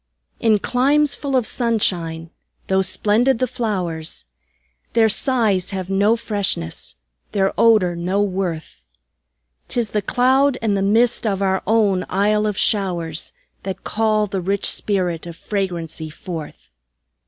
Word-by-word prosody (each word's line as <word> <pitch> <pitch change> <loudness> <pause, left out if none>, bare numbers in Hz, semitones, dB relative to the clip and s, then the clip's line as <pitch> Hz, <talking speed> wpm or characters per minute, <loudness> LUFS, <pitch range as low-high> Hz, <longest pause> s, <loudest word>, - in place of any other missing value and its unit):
In 220 -2 +3
climes 280 +7 +2
full 275 -2 -3
of 250 -3 +2
sunshine, 175 -9 0 0.3
tho' 190 0 +2
splendid 220 +6 +2
the 255 - +1
flowers, 180 - -3 0.7
Their 225 -1 +4
sighs 215 -6 +2
have 190 -1 -4
no 200 +4 +3
freshness, 200 - -2 0.4
their 195 -1 +1
odor 210 -7 +4
no 180 +4 -1
worth; 180 - -4 0.8
'Tis 235 -4 -2
the 210 - 0
cloud 260 +5 +2
and 215 -3 0
the 195 - 0
mist 225 +4 +2
of 200 -1 -1
our 190 0 +1
own 205 -4 +2
Isle 210 +2 +1
of 205 -2 -2
showers, 170 -6 0 0.3
That 190 -1 -6
call 215 -1 +1
the 195 -2 -3
rich 195 +2 -1
spirit 180 -5 -1
of 170 - -8
fragrancy 170 -6 -3
forth. 150 - -8
200 Hz, 130 wpm, -20 LUFS, 180-225 Hz, 0.8 s, Their